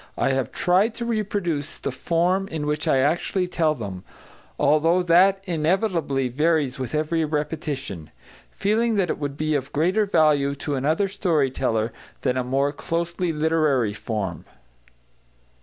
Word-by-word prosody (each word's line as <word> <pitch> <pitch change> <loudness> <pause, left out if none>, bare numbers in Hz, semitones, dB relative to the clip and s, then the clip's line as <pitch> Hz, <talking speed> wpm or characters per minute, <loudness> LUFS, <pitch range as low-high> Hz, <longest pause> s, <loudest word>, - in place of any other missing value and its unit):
I - - +2
have 130 -3 -1
tried 195 +6 +2
to 235 - -4
reproduce 195 -9 -2
the - - -3
form 180 +3 0
in 155 -5 -4
which 150 0 -2
I - - +4
actually 175 +6 +1
tell 160 -3 +1
them, 100 -7 -6 0.5
although 155 +5 +3
that 190 +3 +4
inevitably 165 - 0
varies 145 0 +1
with 130 +1 -3
every 160 +2 0
repetition, 150 - -3 0.4
feeling 220 +3 0
that 190 -5 +1
it - - -4
would 145 -1 -4
be 155 0 0
of 135 -3 -2
greater 185 +8 +1
value 145 -6 +3
to 145 +1 -4
another 155 +9 +1
story 160 -8 +1
teller 110 -2 -1 0.3
than 125 - 0
a 130 - 0
more 135 +3 +1
closely 170 +3 -2
literary 150 -8 +1
form. 105 -6 -4
155 Hz, 145 wpm, -23 LUFS, 140-180 Hz, 0.5 s, I